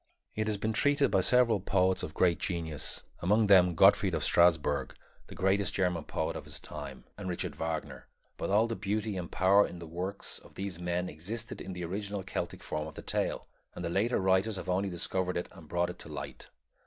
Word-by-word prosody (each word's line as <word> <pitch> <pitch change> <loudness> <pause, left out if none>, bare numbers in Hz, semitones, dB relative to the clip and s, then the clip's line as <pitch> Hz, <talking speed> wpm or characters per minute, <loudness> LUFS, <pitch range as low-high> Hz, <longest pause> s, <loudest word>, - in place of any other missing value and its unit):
It 110 0 -1
has 105 -1 +1
been 110 +2 -1
treated 145 +4 +3
by 95 - +4
several 120 0 +4
poets 95 0 +2
of - - -6
great 85 -2 +3
genius, 80 -5 -2 0.2
among 105 +5 +3
them 90 -3 +6
Gottfried 95 0 +5
of 80 - -1
Strassburg, 80 -5 +3 0.3
the - - -10
greatest 95 +2 +1
German 90 -4 0
poet - - -2
of - - -6
his - - -3
time, 70 -3 -8 0.2
and 95 -2 -4
Richard 90 - -2
Wagner; 80 -1 -4 0.3
but - - -4
all 105 +3 +4
the 115 0 -3
beauty 105 +1 -2
and 90 -2 -5
power 100 +2 +4
in 90 - -9
the 85 - -8
works 90 +5 -4
of - - -18
these 95 -3 -4
men 90 +1 -1
existed 105 +9 -4
in 95 - -6
the 90 -1 -4
original 100 +2 -3
Celtic 95 - -4
form 75 0 -3
of 80 - -10
the - - -8
tale, - - -1 0.3
and 90 - -5
the 85 - -2
later 110 +7 +1
writers 95 +3 +2
have 95 - -6
only 95 +2 +1
discovered 90 +1 -1
it 85 - -3
and 85 -5 -14
brought 85 0 0
it - - -14
to - - -8
light. - - -7
95 Hz, 210 wpm, -31 LUFS, 85-100 Hz, 0.3 s, them